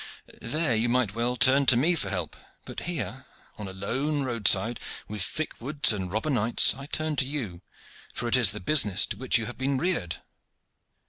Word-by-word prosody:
There 145 +1 -1
you 115 +2 +1
might 120 -5 +1
well 120 +2 -1
turn 135 +2 +4
to 120 - +6
me 160 +8 +3
for 125 - -1
help. 90 -5 -4 0.3
But - - -7
here 130 - -5 0.3
on 105 - -5
a - - -7
lone 135 +10 -2
roadside, 115 -2 +2 0.3
with 105 -1 -3
thick 155 +12 -2
woods 140 -1 +2
and 95 -3 -5
robber 110 +9 -2
knights, 120 -2 +4
I 135 +3 -10
turn 155 0 -2
to 130 - +2
you, 115 -12 -5 0.5
for 120 - -3
it 120 - +3
is 125 -6 +5
the - - -3
business 105 - +3
to - - -6
which 130 -1 +1
you 115 - -3
have 120 +3 -8
been 135 +1 0
reared." 130 - -1
120 Hz, 195 wpm, -26 LUFS, 105-140 Hz, 0.5 s, to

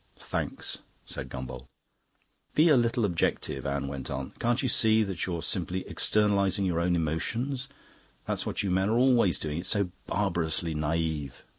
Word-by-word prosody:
"Thanks," - - -4 0.3
said 65 - -6
Gombauld. 65 -1 -7 0.9
"Be 160 +3 +6
a 150 - +7
little 120 -1 +2
objective," 85 -6 -1
Anne 70 0 -1
went 70 -1 -5
on. 65 0 -4
"Can't 120 +3 +1
you - - +2
see 110 -2 +4
that 95 -3 -3
you're 85 -3 -3
simply 90 0 -1
externalising 100 -2 +2
your 85 -3 +1
own 90 +1 +2
emotions? 120 - -1 0.6
That's - - -1
what - - -2
you 100 - 0
men 95 +2 +2
are 115 - +2
always 120 -7 +4
doing; 75 +1 -3
it's 90 - -3
so 100 -4 +2 0.2
barbarously 85 -4 0
naive. 75 -3 -2
90 Hz, 160 wpm, -28 LUFS, 80-110 Hz, 0.9 s, a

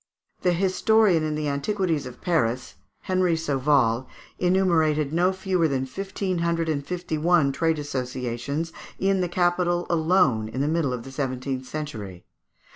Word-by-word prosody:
The 180 - +2
historian 190 0 +3
of 155 - -2
the 150 -1 -2
antiquities 160 +1 -1
of 125 - -11
Paris, 130 -9 0 0.3
Henry 185 -2 +1
Sauval, 135 -5 +1 0.3
enumerated 160 -5 +2
no 175 +3 +3
fewer 190 -3 0
than 135 -3 -1
fifteen 190 +4 -3
hundred 170 -1 0
and 145 -2 -1
fifty 175 -1 -3
one 160 -3 +3
trade 160 +3 +1
associations 130 +2 -3 0.2
in 195 0 +1
the 180 - -1
capital 175 0 +1
alone 160 - +2
in 130 - -5
the 140 - +1
middle 160 -3 +1
of 125 -2 -4
the 135 - -10
seventeenth 130 -1 -3
century. 110 -13 -6
160 Hz, 145 wpm, -25 LUFS, 135-180 Hz, 0.3 s, historian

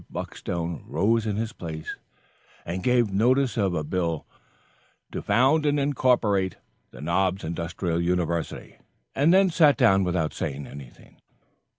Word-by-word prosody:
Buckstone 85 -1 -4
rose 110 +7 +1
in 105 - -1
his 110 +2 -3
place 80 -7 -6 0.7
and 90 +2 -4
gave 120 -2 +2
notice 125 +6 +2
of 100 -6 0
a 75 - -1
bill 85 0 -2 0.9
"To - - -4
Found 135 +6 +3
and 145 0 +2
Incorporate 120 -9 +1 0.3
the - - -12
Knobs 95 +4 0
Industrial 85 +1 -2
University," 85 -1 -2 0.3
and 150 +4 +3
then 190 0 +5
sat 155 -4 +5
down 95 0 +4
without 90 -4 -1
saying 70 +1 -4
anything 70 -4 -13
further. - - -34
95 Hz, 135 wpm, -25 LUFS, 85-125 Hz, 0.9 s, then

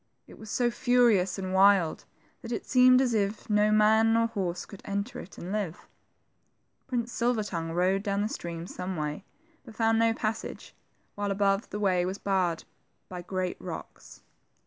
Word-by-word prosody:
It - - -15
was 220 - -10
so 240 +2 +1
furious 235 -7 +3
and 190 -1 -4
wild 190 -4 +4 0.4
that 230 - -8
it 230 - -3
seemed 255 0 +6
as 250 -3 +1
if 205 0 -1
no 210 0 +3
man 220 +1 +4
nor 230 0 +3
horse 190 -6 -3
could 200 - -12
enter 200 +4 -4
it 190 - -11
and 180 - -7
live. 200 -6 -4 1.0
Prince 240 -2 -2
Silver 235 -2 0
tongue 165 -5 -4
rode 185 +3 +1
down 200 -1 -1
the - - 0
stream 170 -5 -6
some 185 +1 -5
way, 150 0 -3 0.4
but 230 -5 -13
found 225 0 +2
iio 225 0 +3
pas 220 0 -1
sage, - - -9 0.4
while 205 0 -3
above, 195 +1 +1
the 210 - -5
way 185 -3 +2
was 185 +2 -3
barred 185 -5 0 0.5
by 180 -1 -6
great 185 0 -3
rocks. - - -9
200 Hz, 175 wpm, -28 LUFS, 185-225 Hz, 1.0 s, seemed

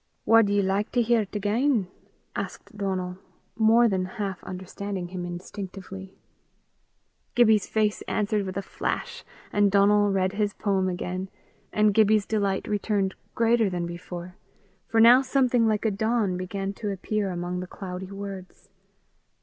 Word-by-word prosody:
"Wad 225 -2 +5
ye 205 0 +2
like 195 +2 0
to 245 - +3
hear 230 -1 +3
't 210 - -5
again?" 215 +1 +1 0.5
asked - - -6
Donal, 185 -2 -3 0.4
more 225 +2 +5
than 190 -4 0
half 195 -3 -3
understanding 185 0 -5
him 180 -1 -5
instinctively. 190 +1 -8 1.2
Gibbie's 220 -4 +4
face 215 -1 0
answered 210 -1 0
with 185 0 -5
a 195 - -2
flash, - - -4 0.3
and 205 -1 +4
Donal 205 +1 +4
read 190 -1 +1
the 205 0 0
poem 190 -3 +1
again, 185 +1 -4 0.4
and 210 -1 +3
Gibbie's 215 -1 +4
delight 200 -3 -1
returned 205 -2 0 0.2
greater 230 -2 +3
than 175 -2 -2
before, 175 +1 -7 0.5
for 225 - +1
now 240 +3 +8
something 255 -3 +2
like 215 0 0
a 220 - +3
dawn 220 -1 0
began 195 +2 -3
to 210 - -1
appear 200 +1 -2
among 175 0 -3
the 180 - -5
cloudy 185 0 -7
words. 195 -2 -8
200 Hz, 145 wpm, -26 LUFS, 185-215 Hz, 1.2 s, now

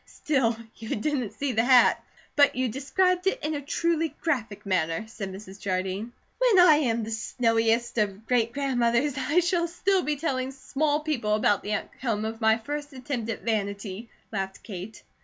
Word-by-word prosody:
"Still, 255 -6 0 0.2
you 225 -1 -4
didn't 250 -3 -2
see 280 +3 -1
the 225 -1 +2
hat!" 250 0 +5 0.3
"But 285 -1 +5
you 255 0 0
described 360 - +1
it 385 - +2
in 305 +1 -1
a 290 - -3
truly 325 +1 0
graphic 240 -12 -2
manner," 170 0 0
said 200 -3 -6
Mrs. 195 0 -10
Jardine. 190 +4 -2 0.3
"When 485 -6 +5
I 310 -4 +7
am 235 -6 0
the 220 - -5
snowiest 230 +1 +1
of 205 0 -1
great 230 -1 +2
grandmothers, 255 0 +1
I 285 +6 +2
shall 345 0 +1
still 375 +3 +1
be 300 -3 -1
telling 265 -3 -2
small 290 +3 0
people 245 -9 0
about 205 -1 +2
the 210 - -3
outcome 215 0 -2
of 225 +1 -5
my 220 0 +4
first 290 +5 -5
attempt 250 -3 -4
at 225 - -4
vanity," 200 0 -3 0.2
laughed 195 -2 -4
Kate. 195 +1 -8
240 Hz, 175 wpm, -26 LUFS, 215-290 Hz, 0.3 s, I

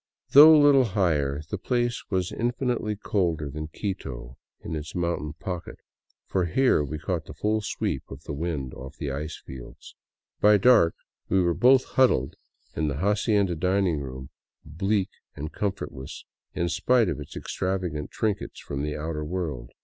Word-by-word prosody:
Though 155 +3 +10
little 140 -3 +6
higher, 75 - 0
the 105 - -2
place 120 +1 -1
was 95 -3 -1
in 120 +2 0
finitely 120 -5 -2
colder 80 -10 -1
than 75 +2 -5
Quito 65 - -5 0.3
in - - -5
its 75 0 -6
mountain 85 -4 -2
pocket, 90 +2 -6 0.5
for 95 -2 0
here 125 - +3
we 75 +2 -4
caught 80 +1 -3
the - - -10
full 110 +1 0
sweep 105 - -3
of 70 +2 -10
the 75 - -5
winds 75 -4 -3
off 65 +2 -10
the 70 -4 -3
ice 75 +3 -4
fields. 65 -2 -11 0.5
By 105 0 +6
dark, 100 -6 +5 0.3
we 95 - +3
were 85 -2 +2
both 130 +6 +5
huddled 120 - +2 0.4
in 80 - 0
the 70 -1 -2
hacienda 100 - +2
dining 90 -1 +1
room, 65 -1 -7 0.3
bleak 95 +6 0 0.3
and 75 +2 -6
comfortless 95 -10 -5 0.3
in 85 -1 0
spite 115 +7 +3
of 80 -4 -2
its 75 - -8
extravagant 90 -6 -3
trinkets 105 -2 -2
from 70 -1 -5
the 75 +1 -3
outer 75 0 -3
world. 75 -7 -4
85 Hz, 160 wpm, -26 LUFS, 75-105 Hz, 0.5 s, Though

